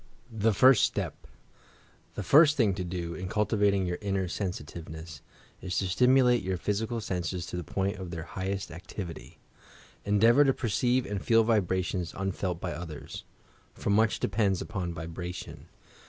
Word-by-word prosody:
THE 110 0 +2
FIRST 130 +4 +6
STEP - - -2 0.9
The 105 - -3
first 150 - +6
thing 110 -7 +3
to 90 0 -3
do, 85 -1 -4
in 95 +1 -5
cultivating 100 -1 +2
your 90 0 -3
inner 95 -2 -1
sensi 95 -2 -3
tiveness, 80 -1 -9 0.4
is 90 0 -3
to 95 - 0
stimulate 125 +4 +4
your 95 0 -2
physical 110 +5 -2
senses 90 -3 -3
to - - -7
the 90 - -3
point 100 +4 -2
of 95 -2 -6
their 85 -2 -5
highest 95 +4 -4
activity. 90 0 -8 0.7
Endeavour 115 +7 +5
to 135 - +4
perceive 120 +3 +1
and 100 -1 -4
feel 115 -1 +4
vibrations 95 -5 0
unfelt 95 -2 -2
by 90 -1 -3
others, 80 -1 -8 0.2
— - - -33
for - - -2
much 110 +2 +3
depends 100 -2 +1
upon 95 -5 -4
vibration. 85 +2 -7
95 Hz, 155 wpm, -29 LUFS, 90-110 Hz, 0.9 s, FIRST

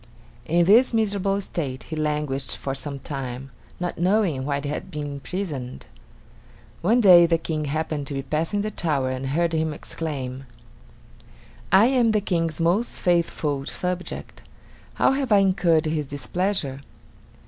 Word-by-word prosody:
In 170 +2 +3
this 230 +6 +5
miserable 200 -3 +1
state 135 -10 -4
he 160 - -6
languished 150 -3 -2
for 135 - -3
some 140 +1 -5
time, 135 -1 -6 0.3
not 175 -1 -3
knowing 180 -7 +1
why 140 -1 0
he 145 - -5
had 145 - -4
been 150 -1 -4
imprisoned. 140 -2 -5 1.0
One 230 +8 +3
day 175 -5 +8
the 165 0 +3
King 155 -2 -3
happened 150 -1 -2
to 140 - -4
be 135 - -3
passing 165 +8 -1
the 215 +1 -3
tower 145 -9 0
and 130 +1 -4
heard 165 +4 0
him 160 -1 0
exclaim: 135 -5 -5 1.3
"I 195 +3 +7
am 245 -3 +3
the 215 - +3
King's 165 -5 -1
most 180 +8 +1
faithful 155 -5 0
subject; 180 0 -4 0.5
how - - +3
have 270 -2 -1
I 205 - +7
incurred 185 -5 +3
his 155 -2 -1
displeasure?" 145 -1 -2
160 Hz, 150 wpm, -24 LUFS, 140-190 Hz, 1.3 s, day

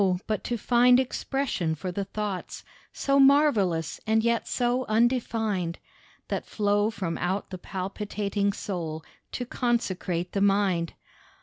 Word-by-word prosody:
but 215 -2 -2
to 240 - -2
find 245 +2 +5
expression 260 - -1
for 180 +4 -4
the 195 +2 -3
thoughts, 205 -2 -4 0.3
So 275 0 +1
marvellous 250 - +4
and 220 0 +3
yet 235 0 +1
so 245 +1 +1
undefined, 220 -6 +1 0.5
That - - -2
flow 205 0 +1
from 190 -6 -3
out 190 +4 -2
the 185 - -6
palpitating 200 +1 -2
soul 165 -6 -5 0.3
To 245 - -3
consecrate 185 -8 -1
the 195 - -1
mind. 195 -4 +2
205 Hz, 125 wpm, -27 LUFS, 185-240 Hz, 0.5 s, find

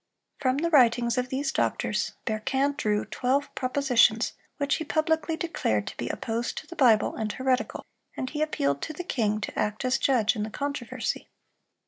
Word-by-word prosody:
From 260 -1 +1
the 335 +3 0
writings 240 -4 +4
of 250 0 -2
these 270 +1 -1
doctors, - - 0
Berquin 265 +6 0
drew 210 -7 0
twelve 265 +3 0
propositions 255 -4 +3 0.2
which 285 -1 +1
he - - -3
publicly 320 +1 0
declared 110 - -1
to - - -7
be 120 - -3
"opposed 230 +1 -3
to - - -5
the 345 - -10
Bible, 230 -8 +4
and 220 -1 -2
heretical;" 260 +1 -1 0.3
and 260 - -2
he 300 +3 -4
appealed 140 - 0
to 310 - -4
the 355 - -5
king 215 -10 0
to - - -4
act 210 +4 -1
as 255 +1 +2
judge 240 -5 +3
in 215 - -3
the 215 - -2
controversy. 255 -1 -3
255 Hz, 175 wpm, -27 LUFS, 220-285 Hz, 0.3 s, writings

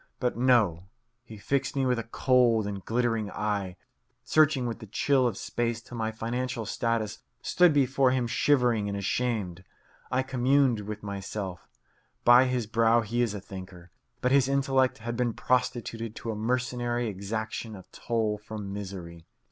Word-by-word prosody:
But 125 -1 0
no; 110 -9 +3 0.4
he 110 -2 -11
fixed 135 +7 -1
me 135 -1 +1
with 125 -2 +1
a - - -3
cold 120 -2 +3
and 100 -2 -5
glittering 115 -3 0
eye, 100 -2 -2 0.5
searching 155 -4 +3
with 115 -1 -3
the 110 - -10
chill 130 +5 +2
of 115 - -3
space 120 -1 -2
till 120 +1 -11
my 110 -1 -1
financial 120 +1 -3
status 115 -1 -1 0.2
stood 180 -2 +4
before 135 -2 +3
him 125 -1 +1
shivering 120 -4 +2
and 100 - -3
ashamed. 100 -3 -2 0.5
I 130 +1 +1
communed 130 -1 +2
with 105 +1 -6
myself: 100 -2 -5 0.6
By 120 +2 +8
his 125 -2 -1
brow 115 +2 +3
he 115 +2 -1
is 115 -4 0
a - - -4
thinker, 95 -2 -10 0.3
but 125 - +1
his 135 -2 +4
intellect 135 -1 +2
has 120 +2 -5
been 120 -1 0
prostituted 120 -3 -1
to 115 - -4
a - - -4
mercenary 120 +1 -1
exaction 110 +2 -4
of 95 - -13
toll 110 -3 -1
from 105 -2 -7
misery. 90 -5 -7
115 Hz, 160 wpm, -28 LUFS, 105-125 Hz, 0.6 s, By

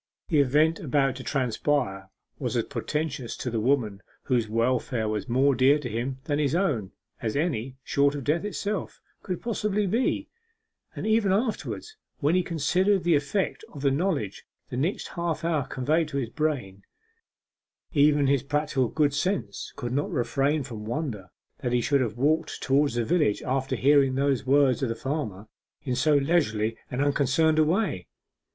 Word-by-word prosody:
The 155 - +3
event 150 +4 +3
about 135 -2 +1
to 130 - -7
transpire 125 -7 -1 0.3
was - - -1
as - - +2
portentous 145 -5 -3
to 125 - -4
the 115 - -1
woman 110 -5 +1 0.2
whose 120 -4 +1
welfare 115 0 0
was 110 +5 -3
more 135 +4 +3
dear 135 +3 +4
to 145 -4 -5
him 120 +4 -3
than 145 0 -1
his 145 0 +1
own, 130 - 0 0.3
as 110 -2 -2
any, 135 -5 -1
short 140 0 +2
of 140 - -4
death 155 +8 +1
itself, 210 -1 -3 0.2
could 180 -3 -5
possibly 210 -3 0
be; 225 +7 0 0.7
and - - -5
ever 220 -2 +3
afterwards, 230 - -2 0.2
when 150 +3 +1
he 185 - +4
considered 180 +4 +1
the 170 0 +3
effect 150 +7 0
of 145 -2 -9
the 140 - +3
knowledge 140 - -1 0.3
the - - -3
next 155 +10 -1
half 170 -2 -3
hour 155 -5 0
conveyed 150 +6 0
to 145 -2 -4
his 120 -4 -2
brain, 125 -12 -2 1.1
even 145 -1 +4
his 135 -1 +3
practical 145 -2 0
good 145 +2 +1
sense 145 - -2
could 120 - -4
not 145 +2 0
refrain 140 +1 0
from 115 -5 -7
wonder 115 - -4 0.3
that 125 - -2
he 125 - +3
should 140 +3 +2
have 115 -2 -2
walked 155 +4 +1
toward 140 +2 +3
the 120 -1 0
village 150 -10 +1
after 130 0 -1
hearing 135 +1 +4
those 135 -2 0
words 135 -2 +4
of 130 - 0
the 115 - -2
farmer, 115 -7 -4 0.4
in 130 - -2
so 145 +4 +3
leisurely 135 -8 +1
and 130 +2 -1
unconcerned 145 +3 +2
a - - +6
way. 165 - 0
140 Hz, 170 wpm, -26 LUFS, 125-155 Hz, 1.1 s, a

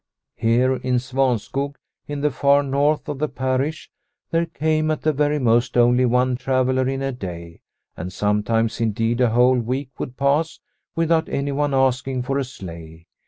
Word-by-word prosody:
Here 120 +3 +2
in 125 0 -1
Svanskog, 135 +2 -1 0.3
in 145 -1 -4
the 150 0 +1
far 140 +2 +3
north 145 +2 +1
of 145 -2 -4
the 155 0 0
parish, 130 +4 -2 0.4
there 165 0 +1
came 155 -1 0
at 155 - -2
the 155 - +2
very 150 +1 +1
most 120 -2 +2
only 120 +1 +4
one 125 +1 +2
traveller 130 0 +1
in 135 0 -2
a 135 - -1
day, 85 -8 -8 0.3
and 90 +2 -6
sometimes 105 +4 0
indeed 115 +2 0
a 125 - +4
whole 125 +2 +4
week 130 +3 -3
would 125 - -5
pass 145 +4 +1 0.4
without 165 -1 +1
anyone 140 0 -1
asking 130 -1 +1
for 135 +2 -1
a - - 0
sleigh. 85 -9 -10
130 Hz, 165 wpm, -22 LUFS, 120-140 Hz, 0.4 s, only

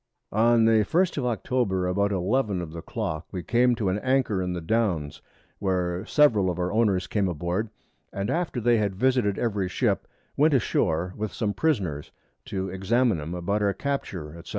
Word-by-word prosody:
On 115 +2 +4
the 110 -1 +4
1st 170 - +1
of 125 - -1
October, 110 -5 0
about 100 +3 +1
11 100 +2 0
of 85 -3 -5
the 85 0 -7
Clock 80 0 -4
we 90 -2 -5
came 120 +1 +3
to 110 -4 -2
an 95 +3 0
Anchor 130 -6 +1
in 90 0 -2
the 90 - -3
Downs, 80 -7 -1 0.4
where 90 -1 -1
several 110 -11 +4
of 90 - -3
our 90 0 -1
Owners 105 -5 +2
came 100 +1 0
aboard, 90 +6 -2 0.4
and 100 +1 -2
after 170 -7 -1
they 120 0 +3
had 100 -3 0
visited 125 -3 +1
every 100 -5 -1
Ship, - - 0 0.3
went 150 0 +4
a - - +5
shoar 90 -4 0
with 105 -1 -3
some 105 -2 -2
Prisoners 95 - -1 0.4
to 95 -1 -3
examine 95 +1 +1
'em 80 +4 -5
about 100 +4 -1
our 100 -1 +2
Capture, 90 - -4
&c. - - -13
100 Hz, 185 wpm, -26 LUFS, 90-120 Hz, 0.4 s, a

